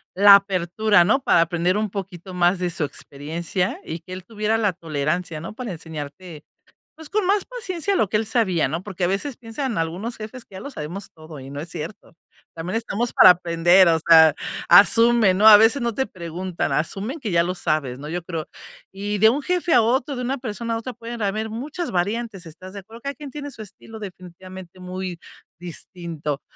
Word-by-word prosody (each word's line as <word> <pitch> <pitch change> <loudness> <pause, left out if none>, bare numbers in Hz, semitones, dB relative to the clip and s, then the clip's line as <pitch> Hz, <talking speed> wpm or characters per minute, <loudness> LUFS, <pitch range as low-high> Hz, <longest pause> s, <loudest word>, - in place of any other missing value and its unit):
la 200 +2 +8
apertura, 195 +1 +2
¿no?, 215 +9 +3
para 170 - +4
aprender 175 +3 +1
un 210 -2 -2
poquito 190 -2 -7
más 180 +1 +2
de 180 -1 -2
su 165 - -2
experiencia 165 +6 -4
y 160 +2 -6
que 175 +3 -11
él 185 0 -8
tuviera 215 +1 -1
la 205 -4 +1
tolerancia, 160 +1 -3
¿no?, 170 - -7
para 235 -1 -6
enseñarte, 160 0 -8 0.5
pues, 315 -1 -11
con 420 -2 +1
más 400 +1 +2
paciencia 400 -6 -3
lo 215 - +1
que 210 - +2
él 220 - -1
sabía, 205 -8 +1
¿no? 165 +2 -3
Porque 190 -2 -6
a - - +3
veces 205 +9 -2
piensan 240 +1 -4
algunos 175 +9 -3
jefes 220 +3 -9
que 195 - -16
ya 190 - -7
lo 280 - -7
sabemos 180 - -7
todo, 155 -2 -12
y 135 - -10
no 140 - -6
es 160 +4 -7
cierto. 165 +3 -8 0.4
También 175 +6 -3
estamos 230 +1 -2
para - - +9
aprender, 175 +1 +4
o 165 -1 +3
sea, 160 -2 +8 0.4
asumen, 230 -2 +6
¿no? 210 - +3
A 215 -1 +11
veces 225 +6 +4
no 235 -1 -1
te 265 +3 -1
preguntan, 175 -2 -4
asumen 195 - -2
que 230 - -4
ya 170 -1 +3
lo 180 +1 -2
sabes, 155 -7 -2
¿no?, 145 - -8
yo 175 +2 -4
creo. 165 -3 -5 0.5
Y 205 +2 -3
de 220 +2 +7
un 275 +6 0
jefe 355 0 0
a - - +6
otro, 260 +4 0
de 250 - -4
una 265 +3 -1
persona 230 -1 -4
a - - -1
otra, 245 +3 -6
puede 235 0 -8
haber 215 +2 -2
muchas 295 +9 -5
variantes, 200 +1 -2
¿estás 185 +4 -12
de 200 - -7
acuerdo? 225 +4 -13
Cada 280 +2 -4
quien 295 -2 -9
tiene 290 +1 -7
su 225 - -9
estilo, 220 +2 -11
definitivamente 185 -1 -11
muy 180 -1 -6 0.4
distinto. 165 -4 -6
190 Hz, 205 wpm, -22 LUFS, 170-225 Hz, 0.5 s, A